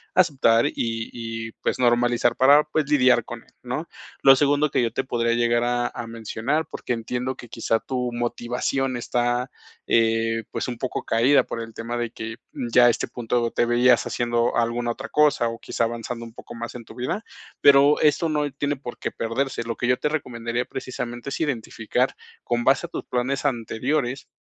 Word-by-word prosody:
aceptar, 135 Hz, -10 st, +4 dB
y 115 Hz, -1 st, -3 dB
y 115 Hz, -1 st, -5 dB
pues, -, -, -1 dB
normalizar 120 Hz, -1 st, +3 dB
para 145 Hz, +3 st, +6 dB
pues 155 Hz, +1 st, 0 dB
lidiar 130 Hz, -3 st, +5 dB
con -, -, -8 dB
él, -, -, -28 dB
¿no? -, -, -4 dB, 0.3 s
Lo 135 Hz, 0 st, +8 dB
segundo 145 Hz, +2 st, +2 dB
que -, -, +1 dB
yo 115 Hz, -, 0 dB
te 135 Hz, -, -2 dB
podría 115 Hz, -2 st, 0 dB
llegar 120 Hz, 0 st, +2 dB
a 120 Hz, 0 st, +1 dB
a 120 Hz, -, -7 dB
mencionar, 115 Hz, +7 st, -2 dB
porque -, -, -6 dB
entiendo 125 Hz, +2 st, -2 dB
que 120 Hz, -, -10 dB
quizá 115 Hz, 0 st, 0 dB
tu 125 Hz, -1 st, -3 dB
motivación 120 Hz, +2 st, -2 dB
está, 120 Hz, +1 st, 0 dB, 0.4 s
eh, 115 Hz, 0 st, +2 dB
pues, -, -, -3 dB
un 125 Hz, -2 st, -4 dB
poco 130 Hz, +1 st, -3 dB
caída 125 Hz, +5 st, +4 dB
por 115 Hz, -, -5 dB
el 115 Hz, 0 st, -8 dB
tema 115 Hz, +2 st, -5 dB
de 120 Hz, -1 st, -2 dB
que 110 Hz, -1 st, -6 dB, 0.2 s
ya 120 Hz, 0 st, +4 dB
este 120 Hz, -, -1 dB
punto 120 Hz, 0 st, -1 dB
te -, -, +1 dB
veías 120 Hz, +1 st, +4 dB
haciendo 120 Hz, -1 st, 0 dB
alguna 115 Hz, 0 st, +1 dB, 0.2 s
otra 135 Hz, +4 st, -6 dB
cosa, 145 Hz, -6 st, +3 dB
o 115 Hz, -, -7 dB
quizá -, -, -2 dB
avanzando 115 Hz, +1 st, -4 dB
un 115 Hz, -, -12 dB
poco -, -, -11 dB
más 115 Hz, 0 st, -6 dB
en 120 Hz, -, -7 dB
tu 110 Hz, -, -14 dB
vida, 130 Hz, -, -3 dB, 0.4 s
pero 140 Hz, +1 st, +6 dB
esto 155 Hz, +2 st, +3 dB
no 150 Hz, -2 st, 0 dB
tiene 145 Hz, +2 st, -2 dB
por 130 Hz, -3 st, -8 dB
qué -, -, -4 dB
perderse. 115 Hz, +3 st, -2 dB
Lo 115 Hz, 0 st, -4 dB
que -, -, -3 dB
yo 125 Hz, -, +3 dB
te 150 Hz, -, -1 dB
recomendaría 120 Hz, -5 st, -3 dB
precisamente 120 Hz, -1 st, -6 dB
es -, -, -4 dB
identificar 125 Hz, -3 st, -1 dB, 0.3 s
con 120 Hz, 0 st, -1 dB
base 135 Hz, +2 st, +3 dB
a -, -, -29 dB
tus -, -, -5 dB
planes 130 Hz, +3 st, -2 dB
anteriores 130 Hz, +1 st, -1 dB
120 Hz, 190 wpm, -24 LUFS, 115-135 Hz, 0.4 s, Lo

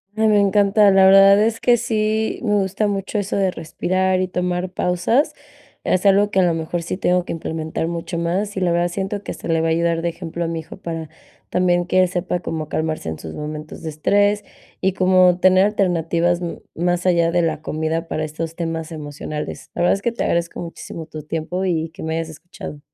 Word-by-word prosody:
Me 220 Hz, 0 st, +2 dB
me 210 Hz, -1 st, +4 dB
encanta, 200 Hz, +1 st, +4 dB
la 190 Hz, 0 st, +6 dB
verdad 195 Hz, +1 st, +7 dB
es 225 Hz, +1 st, +1 dB
que 245 Hz, -1 st, +4 dB
sí 220 Hz, -1 st, 0 dB
me 210 Hz, -3 st, +1 dB
gusta 200 Hz, +1 st, 0 dB
mucho 200 Hz, +1 st, -2 dB
eso 200 Hz, 0 st, -2 dB
de 190 Hz, -2 st, +2 dB
respirar 185 Hz, +3 st, -1 dB
y 185 Hz, -, 0 dB
tomar 180 Hz, 0 st, -2 dB
pausas, 190 Hz, -, +1 dB, 0.5 s
es 185 Hz, -, +1 dB
algo 200 Hz, +1 st, +4 dB
que 190 Hz, -, +2 dB
a -, -, +5 dB
lo 175 Hz, -2 st, +3 dB
mejor 165 Hz, +1 st, -3 dB
sí 170 Hz, +2 st, -4 dB
tengo 180 Hz, -2 st, +2 dB
que -, -, -5 dB
implementar 160 Hz, 0 st, -3 dB
mucho 170 Hz, +1 st, -4 dB
más, 190 Hz, +5 st, -1 dB
y -, -, +1 dB
la 180 Hz, -2 st, +1 dB
verdad 175 Hz, +1 st, +2 dB
siento 195 Hz, +3 st, -3 dB
que -, -, -5 dB
hasta -, -, -8 dB
le 165 Hz, -1 st, +2 dB
va 165 Hz, -, +1 dB
a -, -, +1 dB
ayudar 165 Hz, 0 st, +1 dB
de 170 Hz, -, 0 dB
ejemplo 170 Hz, 0 st, -5 dB
a 165 Hz, -, -1 dB
mi 165 Hz, 0 st, -3 dB
hijo 160 Hz, -, -10 dB
para 165 Hz, -4 st, -5 dB, 0.4 s
también, 175 Hz, -1 st, +2 dB
que 185 Hz, +1 st, +2 dB
él 185 Hz, -, +4 dB
sepa 180 Hz, 0 st, -2 dB
como 160 Hz, -2 st, -4 dB
calmarse 155 Hz, -, -2 dB
en 80 Hz, -, -5 dB
sus 80 Hz, -, -8 dB
momentos 150 Hz, +1 st, -7 dB
de 160 Hz, -, -3 dB
estrés, 205 Hz, +7 st, +2 dB, 0.4 s
y 190 Hz, 0 st, +2 dB
cómo 185 Hz, -1 st, +4 dB
tener 185 Hz, +1 st, +5 dB
alternativas, 175 Hz, -3 st, +1 dB
mm, 170 Hz, -1 st, -4 dB, 0.2 s
más 175 Hz, +1 st, 0 dB
allá 170 Hz, -2 st, +3 dB
de 175 Hz, 0 st, +2 dB
la 155 Hz, -2 st, -1 dB
comida 160 Hz, +2 st, -2 dB
para 155 Hz, -, -2 dB
estos 160 Hz, +2 st, -5 dB
temas 165 Hz, -1 st, -4 dB
emocionales. 150 Hz, -1 st, -6 dB
La -, -, -2 dB
verdad 175 Hz, -, +4 dB
es 195 Hz, -, -2 dB
que 235 Hz, -, 0 dB
te 235 Hz, -, -3 dB
agradezco 170 Hz, 0 st, -1 dB
muchísimo 165 Hz, -1 st, -7 dB
tu 155 Hz, -1 st, -8 dB
tiempo 165 Hz, +4 st, -3 dB
y 165 Hz, -3 st, 0 dB
que 185 Hz, -, -11 dB
me 160 Hz, 0 st, -2 dB
hayas 165 Hz, -1 st, -3 dB
escuchado. 160 Hz, -1 st, -9 dB
175 Hz, 220 wpm, -21 LUFS, 165-195 Hz, 0.5 s, verdad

